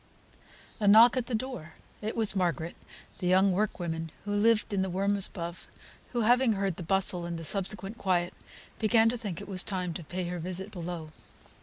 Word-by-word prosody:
A 210 - +1
knock 225 +5 +8
at 255 -2 -1
the 245 - -1
door! 220 -9 -5 0.3
It 215 +1 -3
was 220 -3 +2
Margaret, 170 -3 -1 0.4
the 180 - -2
young 190 +2 +4
workwoman 175 -4 -2 0.2
who 205 - -2
lived 215 +1 +2
in 195 - +1
the 190 - -1
rooms 195 +2 +1
above, 170 -1 -7 0.4
who 240 - 0
having 245 +1 +4
heard 195 -3 -2
the - - -6
bustle, 185 0 +1
and 170 -1 -4
the 165 - -7
subsequent 195 +4 0
quiet, 175 -2 0 0.5
began 225 +1 +4
to 240 - -1
think 205 -8 -5
it - - -9
was 190 -2 0
time 180 -4 -2
to 170 - -6
pay 180 +4 -4
her 180 0 -4
visit 185 +4 -4
below. 170 -4 -6
190 Hz, 190 wpm, -29 LUFS, 175-215 Hz, 0.5 s, knock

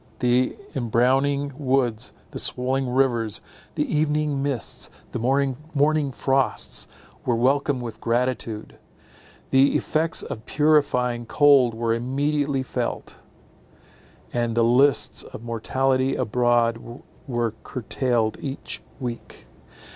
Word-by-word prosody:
The 125 0 +2 0.2
embrowning 135 +4 +1
woods, 130 -5 0 0.2
and - - -2
swollen 130 +1 +1
rivers, 120 -4 +1 0.4
the - - +1
evening 150 -2 +1
mists, 140 -5 -2 0.2
and - - -3 0.5
morning 145 0 +2
frosts, 135 +1 0 0.4
were 120 - +1
welcomed 135 +2 +1
with 115 -2 -7
gratitude. 115 -2 -2 0.7
The 135 +1 +4
effects 160 +1 0
of 110 - -7
purifying 125 -6 +2
cold 135 -5 +5
were 115 0 0
immediately 140 +3 0
felt; - - -4 1.1
and 120 -1 0
the 115 - +5
lists 125 +2 +3
of - - -10
mortality 130 +3 0
abroad 120 -1 +2 0.5
were 120 -4 -1
curtailed 120 -2 -1
each 135 -1 -5 0.2
week. 120 - -7
130 Hz, 100 wpm, -24 LUFS, 120-140 Hz, 1.1 s, cold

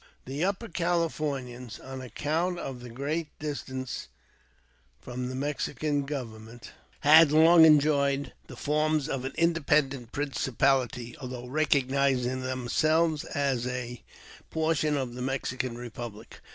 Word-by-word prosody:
THE 140 +5 -3
Upper 200 +4 -1
Californians, 150 - -2
on 130 0 -8
account 160 +8 -1
of 135 -6 -6
their 120 -1 -9
great 150 +5 -3
distance 130 - -5 0.9
from 125 0 -5
the 130 - -5
Mexican 145 +1 -2
government, 115 -4 -7 0.3
had 155 +1 +8
long 160 +2 +8
enjoyed 140 -2 +3
the - - -10
forms 155 0 +1
of 130 -1 -3
an 135 - -4
independent 150 -7 +1
principahty, 130 -3 0
although 125 -1 -6
recognizing 135 -2 +1
themselves 155 +5 +1
as 135 -4 -1
a 125 -1 -5 0.5
portion 155 -2 +1
of 130 -3 -3
the 125 - -7
Mexican 130 -2 -2
Republic. 120 -2 -8
135 Hz, 115 wpm, -28 LUFS, 125-155 Hz, 0.9 s, had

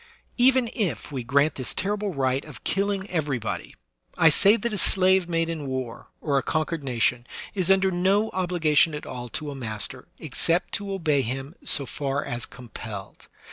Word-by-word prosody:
Even 255 0 +5
if 175 - -2
we 130 -3 -4
grant 140 +5 +2
this 130 - -3
terrible 205 +1 -1
right 135 -3 0
of 150 -3 -12
killing 200 0 -1
every 150 -6 0
body, 115 - -5 0.4
I 165 - +6
say 200 +8 +6
that 235 -1 -3
a - - -2
slave 190 -1 +5
made 165 -1 0
in 160 -4 -4
war, 130 -3 -5
or 140 -3 +1
a - - -3
conquered 155 +1 -2
nation, 120 -1 0 0.3
is 185 -3 -1
under 190 0 +4
no 195 +5 +2
obligation 170 -4 +2
at 150 - -7
all 125 -1 -7
to 150 +4 -4
a - - -7
master, 110 -6 -4
except 170 +2 0
to 200 -1 -2
obey 155 -7 +1
him 135 +4 -4
so 140 - 0
far 140 +1 -3
as 120 -1 -4
compelled. 110 -5 -9
155 Hz, 180 wpm, -25 LUFS, 130-190 Hz, 0.4 s, I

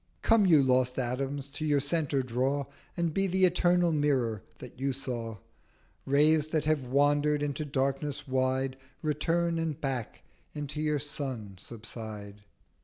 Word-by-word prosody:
Come 225 -3 +5
you 155 -5 +6
lost 125 -1 +2
Atoms 135 +2 -2
to 145 +2 -6
your 145 -2 +3
Centre 145 -2 0
draw, 130 +3 0 0.3
And 170 -2 0
be 195 +2 +2
the 190 +1 +4
Eternal 175 -1 +3
Mirror 135 -8 +1 0.2
that 125 -1 -11
you 135 0 0
saw: 120 -4 -4 0.7
Rays 150 +2 +4
that 155 -1 0
have 150 -4 +1
wander'd 145 +2 +3
into 145 +1 -2
Darkness 140 +1 -1
wide 130 0 0 0.3
Return, 165 +3 +1
and 160 -3 -2
back 130 -5 -3 0.3
into 150 0 -4
your 150 -1 +1
Sun 130 -9 -5
subside.' 110 -2 -8
140 Hz, 140 wpm, -30 LUFS, 130-155 Hz, 0.7 s, you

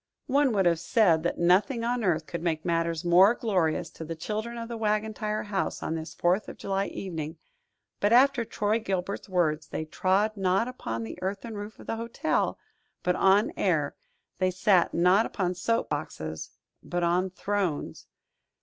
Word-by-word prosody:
One 280 -1 +3
would 195 -3 +2
have 170 -2 +3
said 175 -2 +3
that 170 - -1
nothing 195 +8 +3
on 240 0 0
earth 165 -5 +1
could 170 +1 -5
make 160 -1 -1
matters 165 -1 0
more 185 +6 +6
glorious 175 -8 0
to - - -8
the 165 +1 -5
children 215 +8 -4
of 230 0 -5
the 235 - -5
Wagon 215 0 0
Tire 215 0 -2
House 200 -2 -2
on - - -2
this 160 0 -6
Fourth 180 +4 +1
of - - -9
July 195 0 -1
evening; 165 -4 -5 0.6
but 205 - +2
after 260 +1 +5
Troy 215 0 0
Gilbert's 195 -2 -3
words, 160 -4 +1
they 155 - -4
trod 195 +7 +1
not 195 +3 +1
upon 115 - -4
the 110 - -7
earthen 200 +5 -4
roof 205 +1 -7
of - - -13
the 225 - -3
hotel, 230 +1 -1 0.5
but 180 0 +2
on 195 +3 +4
air; 155 -7 0 0.4
they 185 0 +3
sat 185 -1 +3
not 180 +6 +4
upon 180 -3 -1
soap 230 +6 -1
boxes, 80 - -4 0.3
but 175 0 -3
on 180 +2 +2
thrones. 185 - -3
190 Hz, 175 wpm, -27 LUFS, 170-215 Hz, 0.6 s, more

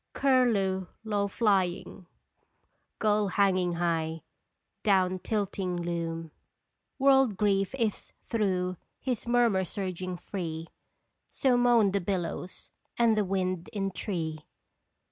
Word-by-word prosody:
Curlew 215 -9 +2 0.2
low 205 -2 0
flying, 190 -3 0 0.9
gull 210 -1 +2
hanging 185 -2 +2
high, 165 -2 -1 0.6
Down 185 -3 +2
tilting 195 -3 -2
loon. 165 -1 -3 0.7
World 270 -6 +4
grief 200 +1 +1
Is 225 -5 -2
through 185 -5 -1 0.2
his 250 -3 -3
murmur 235 -5 +3
surging 185 -1 -4
free, 165 -3 -5 0.6
So 260 -2 +2
moan 240 -4 +4
the 200 0 0
billows, 180 -1 -4 0.3
and 235 -2 +4
the 210 - +2
wind 185 -2 -2
in 195 -2 -1
tree 160 -5 -4
195 Hz, 105 wpm, -29 LUFS, 180-215 Hz, 0.9 s, World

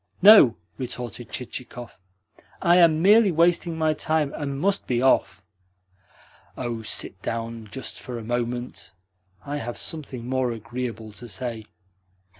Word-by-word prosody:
"No," 195 - +9 0.2
retorted 120 -2 -6
Chichikov. 125 -2 -7 0.6
"I 175 -1 +4
am 165 -2 +5
merely 210 +1 +6
wasting 170 0 +2
my 155 -1 +2
time, 155 -2 0
and 140 -2 -4
must 200 +4 0
be 120 -2 +1
off." 130 -5 +2 1.1
"Oh, 120 -3 -3
sit 100 -3 -2
down 115 0 -4
just 135 +5 -6
for 125 -1 -7
a 115 - -7
moment. 120 -4 -4 0.5
I 145 +1 -3
have 120 -4 -5
something 135 -7 -5
more 130 -2 0
agreeable 115 -1 -6
to 110 +4 -9
say." 115 +1 -3
125 Hz, 130 wpm, -24 LUFS, 115-155 Hz, 1.1 s, No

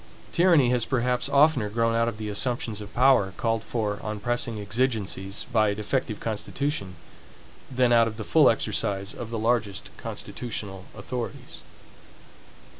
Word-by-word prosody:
Tyranny 170 -8 +4
has 125 -2 +2
perhaps 125 -1 0
oftener 140 -6 +4
grown 115 +2 +1
out 115 0 +2
of 115 -2 -3
the 110 0 -5
assumptions 110 0 -2
of 105 - -9
power, 125 -7 +4
called 115 -1 0
for, 105 -4 -2
on 110 -1 -4
pressing 120 0 -1
exigencies, 105 -3 -2
by 110 -2 +4
a 100 - -1
defective 110 +1 -2
constitution, 110 -2 -3 0.7
than 125 -2 +3
out 115 -1 +5
of 110 -1 -6
the 110 - -4
full - - +5
exercise 100 0 -1
of 120 - -7
the 115 - -3
largest 110 -3 -1
constitutional 100 -6 -6
authorities. 120 +3 -6
115 Hz, 145 wpm, -26 LUFS, 105-125 Hz, 0.7 s, out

